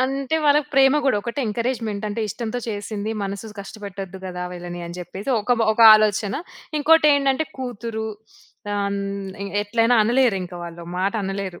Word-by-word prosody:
అంటే, 270 Hz, +3 st, 0 dB
వాళ్ళకి 295 Hz, 0 st, +4 dB
ప్రేమ 270 Hz, +1 st, +6 dB
గూడొకటే 235 Hz, +1 st, 0 dB
ఎంకరేజ్‌మెంటంటే, 220 Hz, -2 st, -2 dB
ఇష్టంతో 230 Hz, +3 st, -4 dB
చేసింది, 205 Hz, 0 st, -4 dB
మనసు 200 Hz, +2 st, -5 dB
కష్టపెట్టొద్దు 195 Hz, -2 st, -8 dB
గదా 180 Hz, -1 st, -5 dB
వీళ్ళని 175 Hz, 0 st, -7 dB
అని 170 Hz, +1 st, -8 dB
జెప్పేసి 190 Hz, +7 st, -5 dB
ఒక 245 Hz, +4 st, +2 dB
మ -, -, +4 dB
ఒక 230 Hz, -, -3 dB
ఆలోచన. 210 Hz, -1 st, +2 dB, 0.4 s
ఇంకోటేంటంటే 295 Hz, -2 st, +4 dB
కూతురు, 230 Hz, -3 st, -4 dB, 0.7 s
ఆహ్, 200 Hz, 0 st, 0 dB
న్ 200 Hz, -1 st, -4 dB
ఎ -, -, -4 dB, 0.2 s
ఎట్లైనా 230 Hz, +3 st, +2 dB
అనలేరింక 225 Hz, -7 st, +1 dB
వాళ్ళు. 170 Hz, 0 st, -9 dB
మాట 195 Hz, +3 st, +1 dB
అనలేరు. 195 Hz, -2 st, -4 dB
215 Hz, 140 wpm, -22 LUFS, 195-250 Hz, 0.7 s, ప్రేమ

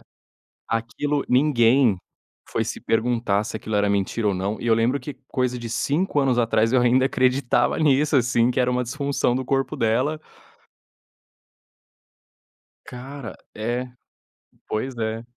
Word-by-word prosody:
pra -, -, -22 dB, 0.6 s
Aquilo 120 Hz, +6 st, -2 dB
ninguém 125 Hz, -4 st, +4 dB, 0.5 s
foi -, -, -1 dB
se -, -, -5 dB
perguntar 115 Hz, -3 st, 0 dB
se 110 Hz, -1 st, -5 dB
aquilo 110 Hz, 0 st, -5 dB
era 105 Hz, 0 st, +2 dB
mentira 100 Hz, +2 st, 0 dB
ou 100 Hz, -, +1 dB
não, 100 Hz, +3 st, -3 dB
e 120 Hz, -, -5 dB
eu 115 Hz, -, +4 dB
lembro 120 Hz, +5 st, +1 dB
que 145 Hz, -, -7 dB
coisa 125 Hz, -1 st, -1 dB
de 120 Hz, -, -6 dB
5 150 Hz, +4 st, 0 dB
anos 130 Hz, -3 st, +1 dB
atrás, 115 Hz, 0 st, +2 dB
eu 130 Hz, -, +4 dB
ainda 125 Hz, +2 st, +3 dB
acreditava 130 Hz, -1 st, +1 dB
nisso, 150 Hz, -1 st, +3 dB
assim, 120 Hz, -1 st, +2 dB
que 125 Hz, +1 st, 0 dB
era 125 Hz, 0 st, +2 dB
uma 125 Hz, 0 st, 0 dB
disfunção 140 Hz, 0 st, -1 dB
do 130 Hz, 0 st, -2 dB
corpo 135 Hz, +1 st, -1 dB
dela. 130 Hz, +8 st, 0 dB, 2.6 s
Cara, 130 Hz, 0 st, -8 dB, 0.2 s
é. 120 Hz, +3 st, -2 dB, 0.8 s
Pois 125 Hz, +4 st, -3 dB
é. 110 Hz, 0 st, -3 dB
125 Hz, 145 wpm, -23 LUFS, 115-135 Hz, 2.6 s, ninguém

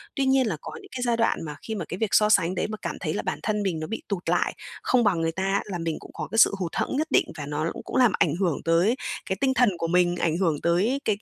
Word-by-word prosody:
Tuy 275 Hz, -, +1 dB
nhiên 265 Hz, -2 st, +3 dB
là 180 Hz, -7 st, -2 dB
có -, -, -7 dB
những -, -, -15 dB
cái 250 Hz, -, -3 dB
giai 240 Hz, -2 st, +1 dB
đoạn 230 Hz, -, +2 dB
mà 150 Hz, -1 st, -6 dB
khi 220 Hz, -, -3 dB
mà 180 Hz, -6 st, -4 dB
cái 180 Hz, -, -6 dB
việc 220 Hz, +1 st, 0 dB
so 210 Hz, 0 st, +5 dB
sánh 185 Hz, -4 st, +3 dB
đấy -, -, -1 dB
mà 215 Hz, -, -5 dB
cảm -, -, -3 dB
thấy -, -, -2 dB
là -, -, -2 dB
bản -, -, -3 dB
thân 210 Hz, -1 st, 0 dB
mình 180 Hz, -5 st, -1 dB
nó 155 Hz, -, -4 dB
bị 225 Hz, -, -4 dB
tụt 195 Hz, -4 st, -3 dB
lại, -, -, +1 dB, 0.3 s
không 250 Hz, -2 st, +3 dB
bằng 190 Hz, -6 st, +2 dB
người 165 Hz, 0 st, 0 dB
ta 190 Hz, +3 st, -3 dB
á, 195 Hz, +1 st, +1 dB
là 195 Hz, -4 st, -4 dB
mình 165 Hz, -2 st, -2 dB
cũng -, -, -13 dB
có -, -, -5 dB
cái 225 Hz, -, -2 dB
sự 225 Hz, -, +6 dB
hụt 175 Hz, -3 st, -2 dB
hẫng -, -, -2 dB
nhất 310 Hz, +1 st, 0 dB
định -, -, +4 dB
và 145 Hz, -, -5 dB
nó 150 Hz, +3 st, -2 dB
cũng -, -, -8 dB
cũng -, -, -6 dB
làm 250 Hz, -4 st, +5 dB
ảnh 155 Hz, -2 st, +3 dB
hưởng 175 Hz, -8 st, 0 dB
tới 170 Hz, +8 st, +3 dB, 0.3 s
cái 190 Hz, -, -1 dB
tinh 265 Hz, -1 st, +3 dB
thần 250 Hz, -3 st, +4 dB
của 165 Hz, -, -2 dB
mình, 175 Hz, +1 st, +3 dB
ảnh 165 Hz, -2 st, 0 dB
hưởng 165 Hz, -6 st, 0 dB
tới 195 Hz, +11 st, +2 dB
cái 210 Hz, -2 st, +1 dB
190 Hz, 315 wpm, -25 LUFS, 165-225 Hz, 0.3 s, sự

